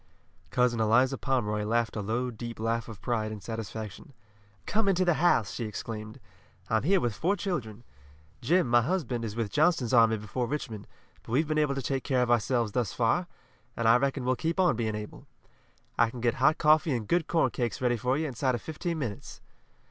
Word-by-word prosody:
Cousin 125 +1 +1
Eliza 120 +5 +3
Pomeroy 110 -7 -1
laughed 115 +2 0
a 105 - -2
low, 120 +5 -2
deep 120 0 -7
laugh 115 +1 -1
of 110 -2 -11
pride 110 -3 -1
and 105 -3 -8
satisfaction. 110 - -7 0.5
"Come 215 -1 0
into 185 -1 +2
the 175 - +4
house," 150 - +2
she 120 - -3
exclaimed. 110 0 -6 0.5
"I'm 110 -1 +3
here 185 +8 +3
with 120 -8 -1
four 180 - 0
children. 125 - -4 0.6
Jim, 170 +7 +2
my 120 0 +4
husband, 130 -5 -1
is 110 -2 -4
with 115 -3 -2
Johnston's 150 -6 +2
army 115 -2 +5
before 110 +4 -3
Richmond, 115 -6 -5 0.3
but - - -12
we've 150 +5 +2
been 155 0 +1
able 145 -2 +1
to 135 - -3
take 135 0 -2
care 130 -3 +1
of 120 - 0
ourselves 120 -1 +1
thus 120 -2 -1
far, 125 +10 +1 0.5
and 115 - +1
I 115 - +7
reckon 135 0 -1
we'll 130 0 +2
keep 165 +7 -2
on 180 -8 +4
being 110 -2 -2
able. 105 0 -8 0.7
I 115 - +5
can 120 - -8
get 120 -1 +1
hot 155 +4 +4
coffee 155 -2 +4
and 110 -3 -4
good 170 -2 +1
corn 160 -7 +2
cakes 120 -2 -2
ready 125 -1 +1
for 125 +3 0
you 160 - -1
inside 130 -1 0
of 120 - -5
fifteen 165 +2 -4
minutes." 120 -9 -5
120 Hz, 200 wpm, -28 LUFS, 110-150 Hz, 0.7 s, I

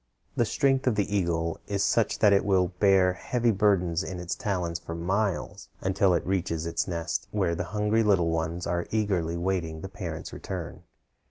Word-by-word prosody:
The 120 - +2
strength 135 +3 +1
of 120 - +3
the 105 0 0
eagle 85 -3 0
is 100 -1 0
such 115 0 +2
that 105 -2 +5
it 100 - +3
will 95 -3 +2
bear 95 -2 +5
heavy 120 +4 0
burdens 95 -4 +2
in 90 -1 -5
its 90 0 -3
talons 90 -5 -2
for 85 -1 -7
miles 95 +3 -2
until 95 -1 +2
it 85 - -1
reaches 90 -3 -1
its 85 - -1
nest, 85 +3 -3
where 95 -4 0
the 85 +1 -3
hungry 105 +4 +1
little 95 -6 +3
ones 85 +2 -2
are 85 0 -1
eagerly 95 -6 0
waiting 85 -3 -2
the 95 - -6
parent's 85 -5 -6
return. - - -6
95 Hz, 180 wpm, -27 LUFS, 85-105 Hz, -, that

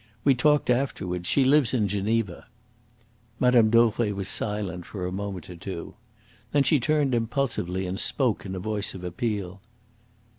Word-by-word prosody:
We 140 - +5
talked 145 +2 +3
afterwards. 95 -9 -1
She 135 - +3
lives 135 -2 +4
in 105 -4 +2
Geneva." 100 -1 -1 0.9
Mme. 125 -3 +5
Dauvray 115 -1 +3
was 100 -1 -4
silent 100 -5 -3
for 90 0 -6
a 90 - -3
moment 95 -3 -5
or 90 - -9
two. 85 0 -7 0.6
Then 145 -1 +4
she 150 0 +3
turned 145 0 +1
impulsively 115 -6 -1
and 95 +2 -3
spoke 125 -3 +1
in 95 -1 -5
a - - -4
voice 105 +1 -3
of 90 - -8
appeal. 95 0 -3
105 Hz, 155 wpm, -26 LUFS, 95-125 Hz, 0.9 s, We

